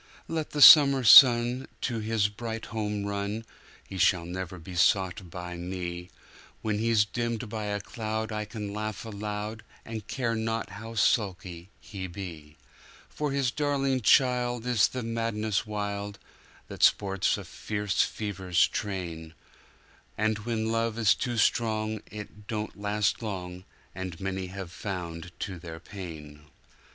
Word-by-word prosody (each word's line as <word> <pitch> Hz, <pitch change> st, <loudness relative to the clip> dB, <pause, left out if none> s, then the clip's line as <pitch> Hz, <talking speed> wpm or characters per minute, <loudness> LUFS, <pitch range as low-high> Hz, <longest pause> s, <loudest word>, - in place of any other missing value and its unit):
Let 160 Hz, -2 st, -3 dB
the 145 Hz, -1 st, +4 dB
summer 140 Hz, -4 st, +9 dB
sun 120 Hz, +2 st, +8 dB
to 120 Hz, -3 st, -1 dB
his 110 Hz, -1 st, +1 dB
bright 115 Hz, +2 st, -6 dB
home 105 Hz, -2 st, -2 dB
run, 100 Hz, +2 st, -3 dB, 0.4 s
He 95 Hz, -, -7 dB
shall 90 Hz, -2 st, +3 dB
never 90 Hz, +1 st, -5 dB
be 90 Hz, +2 st, -10 dB
sought 95 Hz, +1 st, +2 dB
by 90 Hz, +1 st, -7 dB
me; 90 Hz, 0 st, -5 dB, 0.5 s
When 105 Hz, -1 st, 0 dB
he's 115 Hz, -2 st, +3 dB
dimmed 115 Hz, +1 st, -3 dB
by 110 Hz, -1 st, -4 dB
a 105 Hz, 0 st, -2 dB
cloud 110 Hz, +1 st, -4 dB
I 105 Hz, 0 st, -3 dB
can 105 Hz, -2 st, -6 dB
laugh 110 Hz, 0 st, -4 dB
aloud, 105 Hz, +1 st, -5 dB, 0.2 s
And 110 Hz, -2 st, -7 dB
care 120 Hz, -4 st, -1 dB
not 115 Hz, -1 st, -2 dB
how 110 Hz, +3 st, -8 dB
sulky 95 Hz, -5 st, 0 dB
he 100 Hz, -3 st, -7 dB
be; 85 Hz, -5 st, -9 dB, 0.5 s
For 150 Hz, -1 st, -3 dB
his 135 Hz, -3 st, +1 dB
darling 135 Hz, -3 st, 0 dB
child 125 Hz, 0 st, +3 dB
is 120 Hz, -4 st, +4 dB
the 130 Hz, -2 st, -5 dB
madness 115 Hz, -2 st, -1 dB
wildThat 100 Hz, -1 st, -7 dB
sports 95 Hz, -2 st, +3 dB
in -, -, -7 dB
fierce 105 Hz, -2 st, -2 dB
fever's 95 Hz, -5 st, +1 dB
train; 85 Hz, -5 st, -5 dB, 0.8 s
And 110 Hz, 0 st, +1 dB
when 110 Hz, 0 st, -2 dB
love 115 Hz, 0 st, 0 dB
is 110 Hz, -4 st, +5 dB
too 120 Hz, -3 st, -3 dB
strong, 110 Hz, -1 st, +1 dB
it 105 Hz, 0 st, -10 dB
don't 110 Hz, -1 st, -4 dB
last 105 Hz, +1 st, 0 dB
long, 90 Hz, -4 st, -6 dB, 0.3 s
As 90 Hz, -2 st, -6 dB
many 95 Hz, -1 st, -3 dB
have 95 Hz, -2 st, -7 dB
found 90 Hz, -3 st, -6 dB
to 95 Hz, -4 st, -4 dB
their 80 Hz, -1 st, -8 dB
pain. 80 Hz, -6 st, -9 dB
105 Hz, 140 wpm, -28 LUFS, 95-115 Hz, 0.8 s, summer